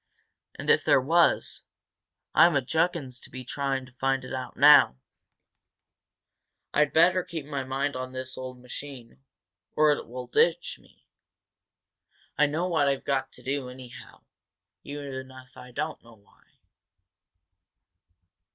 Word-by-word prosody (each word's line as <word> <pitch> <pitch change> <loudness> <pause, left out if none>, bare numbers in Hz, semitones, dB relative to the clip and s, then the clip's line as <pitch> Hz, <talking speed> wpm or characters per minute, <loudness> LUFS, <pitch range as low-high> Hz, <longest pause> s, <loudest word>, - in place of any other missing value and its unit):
"And, - - 0
if - - +3
there - - +5
was, 165 +6 +2 0.7
I'm 170 -2 +6
a 140 - +3
juggins 160 -3 -1
to - - -11
be 130 0 -9
trying 135 0 -2
to 130 - -17
find 135 +1 -1
it 130 - -8 0.2
now. 145 - +7 1.8
I'd 150 0 +3
better 180 +3 +4
keep 165 -5 -6
my 140 -2 -4
mind 135 +2 -2
on 130 0 -5
this 130 0 -5
old 130 -1 -8
machine, 125 -1 -9 0.6
or 155 0 +5
it 145 - -2
will 125 +2 -7
ditch 170 +7 +1
me! - - -25 1.3
I 150 - +4
know 160 +5 -1
what 160 -5 +2
I've 135 -1 -1
got 135 -1 -1
to - - -15
do, 135 -1 -3
anyhow, 125 -1 -12 0.6
even 140 -2 -7
if 130 -1 -15
I 125 - -12
don't 150 +5 -4
know 115 -1 -16
why." 100 -2 -28
135 Hz, 135 wpm, -27 LUFS, 130-150 Hz, 1.8 s, now